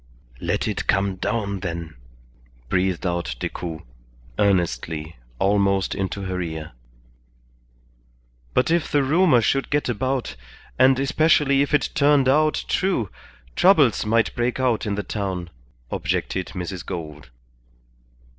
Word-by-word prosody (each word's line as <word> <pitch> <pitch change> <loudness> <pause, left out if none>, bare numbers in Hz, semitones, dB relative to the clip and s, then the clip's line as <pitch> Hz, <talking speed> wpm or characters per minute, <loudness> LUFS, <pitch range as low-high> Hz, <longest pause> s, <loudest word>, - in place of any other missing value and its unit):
"Let - - -1
it - - -3
come 100 -1 +1
down, 100 0 -2
then," 85 -3 -5 0.8
breathed 90 0 0
out 85 -8 -2
Decoud, 80 +2 -5 0.6
earnestly, 80 -5 0 0.2
almost 100 +2 +2
into 95 +1 -3
her 95 -1 -3
ear. 80 -2 -5 1.8
"But 130 - +2
if 170 -1 +1
the 145 -1 +3
rumour 150 -2 +4
should 135 +4 0
get 145 -2 0
about, 130 - -2 0.4
and 130 0 +6
especially 140 -1 +3
if 140 - 0
it 145 - 0
turned 145 -3 +4
out 155 +3 +2
true, 180 - 0 0.4
troubles 160 - +4
might 115 +1 +1
break 120 +1 -1
out 120 -4 +1
in 100 - -1
the 105 - -3
town," 95 -5 -4 0.4
objected 95 -2 -2
Mrs. 90 -1 -5
Gould. 75 -6 -7
100 Hz, 120 wpm, -23 LUFS, 90-135 Hz, 1.8 s, and